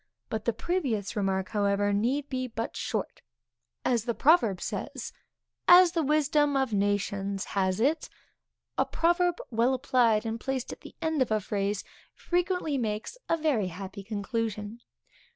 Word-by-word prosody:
But 220 Hz, -1 st, -3 dB
the 235 Hz, -, +3 dB
previous 230 Hz, -, -2 dB
remark, 190 Hz, -2 st, 0 dB
however, 205 Hz, -1 st, +1 dB
need 255 Hz, +8 st, 0 dB
be 255 Hz, -2 st, -2 dB
but 230 Hz, -1 st, -4 dB
short; -, -, -3 dB, 0.6 s
as 235 Hz, -3 st, +1 dB
the 235 Hz, -2 st, -1 dB
proverb 260 Hz, -, +4 dB
says, -, -, -5 dB, 0.5 s
as 355 Hz, 0 st, +8 dB
the 335 Hz, -, 0 dB
wisdom 295 Hz, -1 st, +2 dB
of 265 Hz, -4 st, 0 dB
nations 200 Hz, -1 st, 0 dB
has 190 Hz, 0 st, +1 dB
it. 290 Hz, +8 st, +1 dB, 0.7 s
A -, -, +4 dB
proverb 345 Hz, +1 st, +2 dB
well 235 Hz, +3 st, +2 dB
applied, 240 Hz, -4 st, +2 dB
and 225 Hz, 0 st, -3 dB
placed 265 Hz, 0 st, -3 dB
at -, -, -13 dB
the -, -, -12 dB
end 320 Hz, -3 st, 0 dB
of 255 Hz, -, +2 dB
a 215 Hz, 0 st, +2 dB
phrase, 200 Hz, 0 st, -2 dB, 0.3 s
frequently 350 Hz, -5 st, 0 dB
makes 215 Hz, -, -3 dB
a 330 Hz, -, +3 dB
very 290 Hz, -, +1 dB
happy 190 Hz, +3 st, -7 dB
conclusion. 215 Hz, +1 st, -3 dB
230 Hz, 150 wpm, -28 LUFS, 205-290 Hz, 0.7 s, as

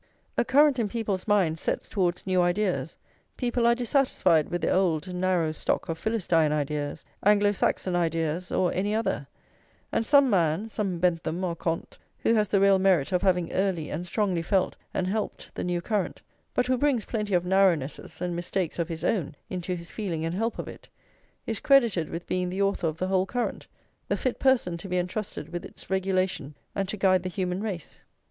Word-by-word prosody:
A -, -, +3 dB
current 280 Hz, +2 st, +4 dB
in 215 Hz, -3 st, 0 dB
people's 205 Hz, -4 st, -2 dB
minds 180 Hz, -6 st, +2 dB
sets -, -, -2 dB
towards 180 Hz, -4 st, -1 dB
new 185 Hz, -1 st, +2 dB
ideas; 180 Hz, +2 st, 0 dB, 0.4 s
people 240 Hz, -1 st, +1 dB
are 235 Hz, -, +5 dB
dissatisfied 235 Hz, -, +2 dB
with 175 Hz, 0 st, -3 dB
their -, -, +2 dB
old 180 Hz, -2 st, +1 dB
narrow 180 Hz, -3 st, +1 dB
stock 155 Hz, -, -2 dB
of 165 Hz, -, -2 dB
Philistine 175 Hz, -8 st, +1 dB
ideas, 150 Hz, 0 st, -2 dB, 0.2 s
Anglo 205 Hz, 0 st, +5 dB
Saxon 185 Hz, -2 st, 0 dB
ideas, 165 Hz, 0 st, -1 dB
or 180 Hz, -2 st, +1 dB
any 205 Hz, +3 st, 0 dB
other; 225 Hz, -, -1 dB, 0.6 s
and -, -, +1 dB
some 280 Hz, +3 st, +5 dB
man, 180 Hz, -1 st, +2 dB
some 200 Hz, -5 st, -2 dB
Bentham 170 Hz, 0 st, 0 dB
or 175 Hz, -2 st, -1 dB
Comte, 165 Hz, 0 st, -3 dB, 0.2 s
who 230 Hz, -, +2 dB
has 215 Hz, -2 st, +3 dB
the 200 Hz, +1 st, +2 dB
real 195 Hz, -1 st, +5 dB
merit 185 Hz, -7 st, +3 dB
of 180 Hz, -, +2 dB
having 180 Hz, -3 st, +1 dB
early 185 Hz, -5 st, 0 dB
and 175 Hz, +4 st, -4 dB
strongly 185 Hz, -2 st, 0 dB
felt 185 Hz, +2 st, +1 dB, 0.2 s
and 185 Hz, -, -1 dB
helped 210 Hz, +3 st, -3 dB
the -, -, -4 dB
new 175 Hz, -1 st, -1 dB
current, 205 Hz, +1 st, -2 dB, 0.3 s
but 250 Hz, -, +2 dB
who 255 Hz, 0 st, +1 dB
brings 270 Hz, -6 st, +2 dB
plenty 210 Hz, -4 st, -1 dB
of 175 Hz, -, +2 dB
narrownesses 180 Hz, -7 st, +1 dB
and 175 Hz, -1 st, -2 dB
mistakes 175 Hz, 0 st, -2 dB
of 170 Hz, 0 st, -1 dB
his 165 Hz, -1 st, -5 dB
own 175 Hz, -10 st, 0 dB, 0.2 s
into 180 Hz, 0 st, -2 dB
his 170 Hz, -1 st, -9 dB
feeling 170 Hz, -7 st, -3 dB
and 165 Hz, -, -2 dB
help 225 Hz, +5 st, -1 dB
of -, -, -5 dB
it, -, -, -11 dB, 0.6 s
is 225 Hz, -2 st, -3 dB
credited 230 Hz, -, +3 dB
with 170 Hz, +1 st, -5 dB
being 180 Hz, -1 st, -1 dB
the 185 Hz, +2 st, -4 dB
author 195 Hz, -4 st, +1 dB
of 155 Hz, 0 st, -3 dB
the 185 Hz, -, -1 dB
whole 190 Hz, 0 st, +1 dB
current, 245 Hz, +2 st, -3 dB, 0.4 s
the -, -, 0 dB
fit 255 Hz, -, -2 dB
person 245 Hz, -10 st, +2 dB
to 175 Hz, -, -8 dB
be 180 Hz, -, 0 dB
entrusted 180 Hz, -3 st, -3 dB
with 175 Hz, -, -3 dB
its -, -, -13 dB
regulation 185 Hz, -5 st, 0 dB, 0.2 s
and 195 Hz, -1 st, -2 dB
to 215 Hz, -, -3 dB
guide 185 Hz, -2 st, +4 dB
the 185 Hz, -, -4 dB
human 185 Hz, 0 st, -2 dB
race. 195 Hz, -7 st, -5 dB
185 Hz, 195 wpm, -27 LUFS, 170-210 Hz, 0.6 s, are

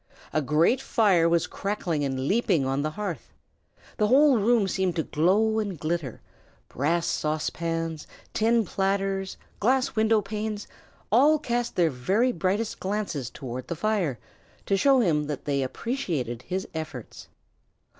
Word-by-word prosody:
A 155 Hz, -, +2 dB
great 160 Hz, -, +2 dB
fire 195 Hz, -11 st, +3 dB
was 170 Hz, -1 st, +2 dB
crackling 180 Hz, -7 st, -2 dB
and 135 Hz, -2 st, -2 dB
leaping 195 Hz, -, +2 dB
on 135 Hz, +1 st, 0 dB
the 155 Hz, -, -1 dB
hearth. 175 Hz, -, -6 dB, 0.6 s
The 210 Hz, -, +2 dB
whole 270 Hz, +1 st, +5 dB
room 220 Hz, -1 st, +3 dB
seemed 185 Hz, -1 st, 0 dB
to 160 Hz, -, 0 dB
glow 205 Hz, +10 st, +2 dB
and 200 Hz, -7 st, -3 dB
glitter: 155 Hz, -6 st, -3 dB, 0.5 s
brass 165 Hz, +6 st, 0 dB
saucepans, 165 Hz, +1 st, -2 dB, 0.3 s
tin 230 Hz, 0 st, +2 dB
platters, 195 Hz, 0 st, -1 dB, 0.2 s
glass 255 Hz, +4 st, +1 dB
window 220 Hz, 0 st, +3 dB
panes, 210 Hz, +1 st, -4 dB, 0.5 s
all 285 Hz, +8 st, +5 dB
cast 240 Hz, -3 st, -2 dB
their 170 Hz, -3 st, +3 dB
very 195 Hz, -, +1 dB
brightest 195 Hz, +4 st, -1 dB
glances 190 Hz, -, -3 dB
toward 130 Hz, 0 st, -7 dB
the 170 Hz, -, -3 dB
fire, 175 Hz, -, 0 dB, 0.5 s
to 195 Hz, -, +2 dB
show 265 Hz, +5 st, +4 dB
him 155 Hz, -8 st, +1 dB
that 150 Hz, -3 st, -5 dB
they 140 Hz, -1 st, 0 dB
appreciated 135 Hz, -, -3 dB
his 190 Hz, +1 st, -3 dB
efforts. 155 Hz, -7 st, -7 dB
185 Hz, 140 wpm, -26 LUFS, 155-220 Hz, 0.6 s, whole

